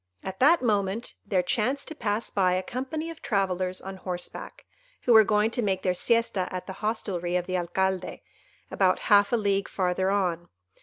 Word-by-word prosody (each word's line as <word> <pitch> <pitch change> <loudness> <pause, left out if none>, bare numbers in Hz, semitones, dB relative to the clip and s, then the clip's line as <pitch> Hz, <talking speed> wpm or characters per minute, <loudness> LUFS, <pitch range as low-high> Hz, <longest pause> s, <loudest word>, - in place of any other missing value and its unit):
At 190 0 -6
that 300 +3 +5
moment 205 0 0
there 185 -3 +1
chanced 250 +9 -1
to - - -6
pass 225 -6 -2
by 185 -2 +2
a 185 +1 0
company 290 - -4
of 330 - -12
travellers 185 -3 -1
on 190 0 -7
horseback, 180 -1 -6 0.4
who 245 - +4
were 220 -1 +9
going 210 +1 +2
to 245 - -1
make 190 -3 -1
their 185 - +2
siesta 230 -2 +1
at 185 -1 -5
the 190 - -6
hostelry 190 -5 -2
of 180 -1 0
the 185 0 -3
Alcalde, 185 +1 -1 0.5
about 185 -2 +2 0.2
half 205 0 +5
a 240 - +3
league 200 -2 0
farther 185 0 0
on. 180 -4 -1
195 Hz, 185 wpm, -27 LUFS, 185-225 Hz, 0.5 s, were